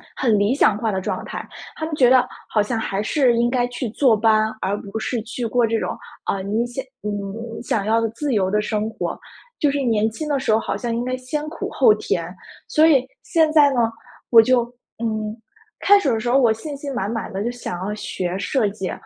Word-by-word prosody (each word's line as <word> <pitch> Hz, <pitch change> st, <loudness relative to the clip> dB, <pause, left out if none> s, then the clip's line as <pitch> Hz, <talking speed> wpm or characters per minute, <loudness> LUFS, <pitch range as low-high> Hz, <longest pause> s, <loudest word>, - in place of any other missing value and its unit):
很 225 Hz, -5 st, +2 dB
理 205 Hz, +5 st, +2 dB
想 215 Hz, -7 st, +3 dB
化 220 Hz, -1 st, -1 dB
的 190 Hz, -, -2 dB
状 -, -, -3 dB
态， -, -, -6 dB, 0.3 s
他 -, -, -7 dB
们 315 Hz, -1 st, -3 dB
觉 250 Hz, -4 st, +5 dB
得 255 Hz, -1 st, +6 dB, 0.2 s
好 215 Hz, -, +2 dB
像 225 Hz, +3 st, -2 dB
还 200 Hz, -2 st, -2 dB
是 250 Hz, +1 st, +2 dB
应 240 Hz, +1 st, +2 dB
该 245 Hz, -1 st, +1 dB
去 245 Hz, -1 st, -4 dB
坐 240 Hz, 0 st, +3 dB
班， 220 Hz, 0 st, +3 dB
而 200 Hz, +2 st, -1 dB
不 205 Hz, +2 st, -6 dB
是 240 Hz, +2 st, -2 dB
去 240 Hz, +2 st, -6 dB
过 240 Hz, +1 st, +2 dB
这 225 Hz, 0 st, 0 dB
种， -, -, -3 dB, 0.3 s
啊， 195 Hz, -, -1 dB
你 215 Hz, +4 st, 0 dB
想 250 Hz, +2 st, -5 dB, 0.2 s
你 210 Hz, -, -3 dB, 0.5 s
想 205 Hz, -4 st, -1 dB
要 225 Hz, +1 st, +3 dB
的 230 Hz, -, +1 dB
自 275 Hz, +4 st, -3 dB
由 190 Hz, -2 st, +1 dB
的 210 Hz, +1 st, +2 dB
生 215 Hz, 0 st, -1 dB
活， -, -, -4 dB, 0.4 s
就 290 Hz, -, +3 dB
是 280 Hz, 0 st, -1 dB
年 220 Hz, -4 st, +2 dB
轻 305 Hz, +7 st, -5 dB
的 285 Hz, -2 st, +1 dB
时 260 Hz, -, 0 dB
候， 220 Hz, -, +4 dB
好 -, -, -3 dB
像 235 Hz, -2 st, -2 dB
应 240 Hz, -, -1 dB
该 255 Hz, 0 st, -2 dB
先 255 Hz, +4 st, -3 dB
苦 335 Hz, -, -5 dB
后 255 Hz, -5 st, +5 dB
甜。 175 Hz, -4 st, -2 dB, 0.4 s
所 310 Hz, +1 st, +4 dB
以 275 Hz, -6 st, +5 dB, 0.2 s
现 320 Hz, -2 st, +2 dB
在 295 Hz, -2 st, +6 dB
呢， 245 Hz, -, +1 dB, 0.5 s
我 230 Hz, -, +8 dB
就， 250 Hz, +1 st, +3 dB, 0.4 s
嗯， 215 Hz, -1 st, -2 dB, 0.4 s
开 405 Hz, 0 st, +6 dB
始 285 Hz, -, 0 dB
的 225 Hz, -, +1 dB
时 240 Hz, +2 st, -2 dB
候， 255 Hz, -, +4 dB
我 240 Hz, -4 st, +4 dB
信 285 Hz, +7 st, -7 dB
心 280 Hz, -1 st, -5 dB
满 205 Hz, -5 st, -2 dB
满 225 Hz, -3 st, -4 dB
地 195 Hz, +1 st, -2 dB
就 235 Hz, -, -1 dB
想 240 Hz, -7 st, -6 dB
要 210 Hz, -, -2 dB
学 185 Hz, -3 st, -3 dB
设 220 Hz, +1 st, 0 dB
计， 200 Hz, -2 st, -5 dB
230 Hz, 250 characters per minute, -21 LUFS, 210-260 Hz, 0.5 s, 我